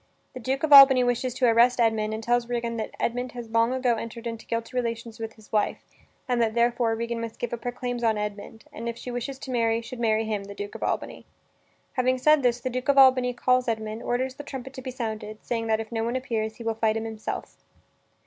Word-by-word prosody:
The -, -, -7 dB
Duke 265 Hz, +4 st, -2 dB
of 305 Hz, -2 st, +4 dB
Albany 270 Hz, -2 st, +10 dB
wishes 245 Hz, +1 st, 0 dB
to 255 Hz, -, +2 dB
arrest 240 Hz, +2 st, +4 dB
Edmund, 220 Hz, -2 st, +2 dB
and 220 Hz, +1 st, -4 dB
tells 240 Hz, +1 st, +1 dB
Regan 235 Hz, -1 st, -2 dB
that 220 Hz, -, -3 dB
Edmund 245 Hz, +1 st, -2 dB
has 240 Hz, -2 st, -8 dB
long 230 Hz, +1 st, +3 dB
ago 255 Hz, -2 st, +1 dB
entered 230 Hz, +1 st, -7 dB
into 230 Hz, -1 st, -6 dB
guilty 230 Hz, +2 st, -3 dB
relations 230 Hz, -2 st, -3 dB
with 225 Hz, 0 st, -5 dB
his 220 Hz, -1 st, -19 dB
wife, 210 Hz, -1 st, +1 dB, 0.5 s
and 245 Hz, -2 st, +1 dB
that, 225 Hz, -1 st, +1 dB
therefore, 235 Hz, -1 st, +2 dB
Regan 235 Hz, 0 st, -3 dB
must 230 Hz, -1 st, -6 dB
give 240 Hz, -, -4 dB
up 235 Hz, -1 st, -5 dB
her 245 Hz, -, -2 dB
claims 245 Hz, -1 st, -4 dB
on 220 Hz, -2 st, +2 dB
Edmund, 210 Hz, +1 st, -6 dB
and 230 Hz, +1 st, -4 dB
if 235 Hz, -, -5 dB
she 250 Hz, -, -7 dB
wishes 245 Hz, +3 st, -4 dB
to 265 Hz, -, -7 dB
marry, 230 Hz, -2 st, +1 dB
should 235 Hz, +1 st, -8 dB
marry 220 Hz, -1 st, +1 dB
him, 210 Hz, -2 st, -3 dB
the 200 Hz, 0 st, -9 dB
Duke 205 Hz, 0 st, -6 dB
of -, -, -9 dB
Albany. -, -, -3 dB, 0.7 s
Having 255 Hz, 0 st, +1 dB
said 300 Hz, +3 st, +4 dB
this, 245 Hz, -1 st, +2 dB
the 255 Hz, +1 st, -3 dB
Duke 255 Hz, +3 st, -3 dB
of 280 Hz, -, +4 dB
Albany 260 Hz, -2 st, +6 dB
calls 255 Hz, +1 st, +1 dB
Edmund, 220 Hz, -1 st, -3 dB
orders 255 Hz, +2 st, -1 dB
the 290 Hz, -, -9 dB
trumpet 265 Hz, -2 st, -7 dB
to 260 Hz, -, -8 dB
be 260 Hz, -, -6 dB
sounded, 220 Hz, -3 st, -5 dB
saying 230 Hz, -1 st, -2 dB
that, 220 Hz, 0 st, +2 dB
if 225 Hz, 0 st, -6 dB
no 225 Hz, -1 st, -1 dB
one 235 Hz, +2 st, -2 dB
appears, 225 Hz, -4 st, -2 dB
he 235 Hz, -, -9 dB
will 225 Hz, 0 st, 0 dB
fight 220 Hz, 0 st, +1 dB
him 225 Hz, -, -3 dB
himself. 220 Hz, -1 st, -6 dB
235 Hz, 240 wpm, -26 LUFS, 225-250 Hz, 0.7 s, Albany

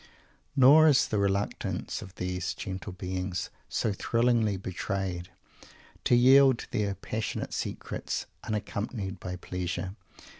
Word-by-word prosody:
Nor 145 Hz, +4 st, +8 dB
is 145 Hz, -2 st, +5 dB
the 105 Hz, -, +1 dB
reluctance 100 Hz, 0 st, -1 dB
of 95 Hz, 0 st, -11 dB
these 90 Hz, -1 st, -3 dB
gentle 95 Hz, +2 st, -5 dB
beings, 90 Hz, 0 st, -3 dB, 0.2 s
so 105 Hz, -, 0 dB
thrillingly 115 Hz, -1 st, +2 dB
betrayed, 95 Hz, -1 st, -3 dB, 0.8 s
to 120 Hz, -, +5 dB
yield 130 Hz, +1 st, +6 dB
their 100 Hz, -2 st, 0 dB
passionate 110 Hz, +3 st, -4 dB
secrets, -, -, -3 dB, 0.2 s
unaccompanied 105 Hz, -1 st, -3 dB
by 90 Hz, 0 st, -5 dB
pleasure. 90 Hz, +1 st, -4 dB
100 Hz, 110 wpm, -29 LUFS, 90-115 Hz, 0.8 s, Nor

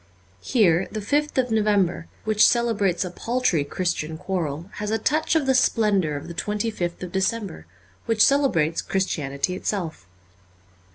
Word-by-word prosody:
Here 190 Hz, -7 st, +2 dB
the 215 Hz, -, -4 dB
5th 290 Hz, +9 st, -1 dB
of 250 Hz, -2 st, +1 dB
November, 205 Hz, -6 st, +1 dB, 0.2 s
which 215 Hz, -1 st, +3 dB
celebrates 205 Hz, -7 st, +2 dB
a 180 Hz, -, -5 dB
paltry 235 Hz, -, 0 dB
Christian 160 Hz, 0 st, -3 dB
quarrel, 170 Hz, -1 st, -4 dB
has 210 Hz, 0 st, -3 dB
a 220 Hz, -, +1 dB
touch 305 Hz, +9 st, 0 dB
of 315 Hz, -3 st, +2 dB
the 265 Hz, -, +3 dB
splendour 210 Hz, -, +2 dB
of 145 Hz, -, -5 dB
tTie 170 Hz, -, -7 dB, 0.4 s
25th 175 Hz, -3 st, -4 dB
of 180 Hz, -, -6 dB
December, 190 Hz, -, -2 dB, 0.4 s
which 225 Hz, -2 st, +4 dB
celebrates 180 Hz, -, +2 dB
Christianity 155 Hz, -4 st, -2 dB
itself. 180 Hz, -, -4 dB
195 Hz, 145 wpm, -24 LUFS, 170-225 Hz, 0.4 s, which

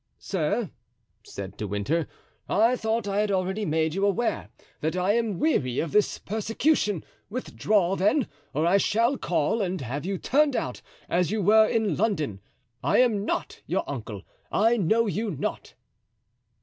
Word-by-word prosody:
"Sir," 195 Hz, +4 st, -1 dB, 0.5 s
said 100 Hz, -1 st, -8 dB
De 105 Hz, -, -3 dB
Winter, 105 Hz, -, -1 dB, 0.4 s
"I 225 Hz, +5 st, +4 dB
thought 220 Hz, -2 st, -1 dB
I 200 Hz, 0 st, 0 dB
had 210 Hz, 0 st, +1 dB
already 190 Hz, +2 st, 0 dB
made 160 Hz, -1 st, +1 dB
you 195 Hz, +2 st, -1 dB
aware 205 Hz, -, 0 dB, 0.3 s
that 160 Hz, +3 st, -1 dB
I 185 Hz, +3 st, +2 dB
am 225 Hz, -5 st, 0 dB
weary 130 Hz, -, +1 dB
of 165 Hz, -, -1 dB
this 210 Hz, -1 st, +2 dB
persecution; 215 Hz, -, 0 dB, 0.2 s
withdraw, 205 Hz, -5 st, 0 dB
then, 210 Hz, +8 st, +2 dB, 0.2 s
or 155 Hz, +3 st, 0 dB
I 180 Hz, +4 st, +5 dB
shall 230 Hz, +6 st, +2 dB
call 180 Hz, -, 0 dB
and 185 Hz, -1 st, -1 dB
have 135 Hz, +3 st, -4 dB
you 190 Hz, +2 st, -2 dB
turned 285 Hz, -, +2 dB
out 125 Hz, -, -3 dB, 0.3 s
as 175 Hz, -1 st, +1 dB
you 215 Hz, 0 st, -1 dB
were 215 Hz, +3 st, +6 dB
in 215 Hz, -9 st, 0 dB
London. 155 Hz, -, -1 dB, 0.4 s
I -, -, +3 dB
am 220 Hz, -5 st, +3 dB
not -, -, -3 dB
your -, -, -1 dB
uncle, -, -, -6 dB, 0.3 s
I 225 Hz, +3 st, +3 dB
know 225 Hz, +3 st, +2 dB
you 215 Hz, +2 st, -1 dB
not." 160 Hz, -, -4 dB
200 Hz, 160 wpm, -26 LUFS, 165-220 Hz, 0.5 s, were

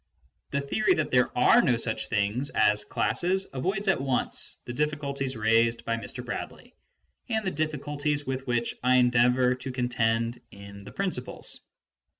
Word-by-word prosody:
The 140 Hz, -, -1 dB
theory 175 Hz, +10 st, +1 dB
that 155 Hz, -2 st, -1 dB
there 125 Hz, -1 st, +4 dB
are -, -, +6 dB
no 125 Hz, -3 st, +2 dB
such 115 Hz, -1 st, -1 dB
things 110 Hz, +6 st, 0 dB
as 105 Hz, -1 st, +2 dB
classes 190 Hz, +2 st, +1 dB
avoids 195 Hz, +10 st, -2 dB
at 190 Hz, -8 st, +2 dB
once 135 Hz, -2 st, 0 dB
the 120 Hz, -, -5 dB
difficulties 140 Hz, -2 st, -2 dB
raised 115 Hz, +2 st, +2 dB
by 115 Hz, -, 0 dB
Mr. 115 Hz, -3 st, -6 dB
Bradley -, -, -7 dB, 0.6 s
and 220 Hz, -2 st, 0 dB
the 190 Hz, -, 0 dB
difficulties 145 Hz, -1 st, -2 dB
with 135 Hz, 0 st, -4 dB
which 120 Hz, -1 st, 0 dB
I 125 Hz, +1 st, +3 dB
endeavour 125 Hz, 0 st, +4 dB
to 130 Hz, +1 st, -6 dB
contend 120 Hz, -1 st, 0 dB
in 100 Hz, -1 st, -12 dB
the -, -, -9 dB
Principles. 185 Hz, -11 st, -3 dB
125 Hz, 150 wpm, -27 LUFS, 115-145 Hz, 0.6 s, are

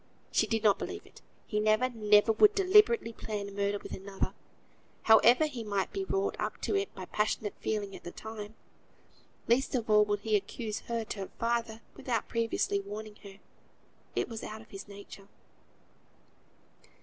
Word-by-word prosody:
she -, -, +2 dB
did 225 Hz, -1 st, -1 dB
not 205 Hz, -2 st, +4 dB
believe -, -, -6 dB
it; -, -, -17 dB, 0.2 s
he 210 Hz, -, -1 dB
never, 215 Hz, +4 st, +3 dB
never 215 Hz, -2 st, +4 dB
would 415 Hz, -, +5 dB
deliberately 420 Hz, -, +4 dB
plan 210 Hz, -2 st, -5 dB
a -, -, -11 dB
murder 200 Hz, 0 st, -1 dB
with -, -, -9 dB
another, 195 Hz, 0 st, -4 dB, 0.7 s
however 235 Hz, +6 st, +6 dB
he 260 Hz, -7 st, -5 dB
might 200 Hz, -2 st, -2 dB
be 390 Hz, -, -2 dB
wrought 390 Hz, +1 st, -1 dB
up -, -, -3 dB
to -, -, -1 dB
it 400 Hz, 0 st, 0 dB
by 185 Hz, -, -6 dB
passionate 210 Hz, +1 st, -1 dB
feeling 205 Hz, -2 st, -2 dB
at -, -, -11 dB
the 175 Hz, -, -6 dB
time. 220 Hz, 0 st, -8 dB, 0.9 s
Least 260 Hz, +4 st, +2 dB
of 230 Hz, -3 st, -1 dB
all 210 Hz, 0 st, +7 dB
would 205 Hz, -1 st, -1 dB
he 215 Hz, 0 st, +1 dB
accuse 210 Hz, +2 st, -3 dB
her 230 Hz, -1 st, -1 dB
to 210 Hz, -, -6 dB
her 195 Hz, -, -5 dB
father, 230 Hz, -1 st, -1 dB
without 235 Hz, -4 st, -2 dB
previously 230 Hz, -3 st, 0 dB
warning 210 Hz, +1 st, -7 dB
her; 195 Hz, -2 st, -13 dB, 0.8 s
it -, -, 0 dB
was 225 Hz, -2 st, -7 dB
out 215 Hz, +1 st, -7 dB
of 220 Hz, -, -18 dB
his 195 Hz, +1 st, -8 dB
nature). 200 Hz, -1 st, -11 dB
215 Hz, 175 wpm, -30 LUFS, 205-235 Hz, 0.9 s, all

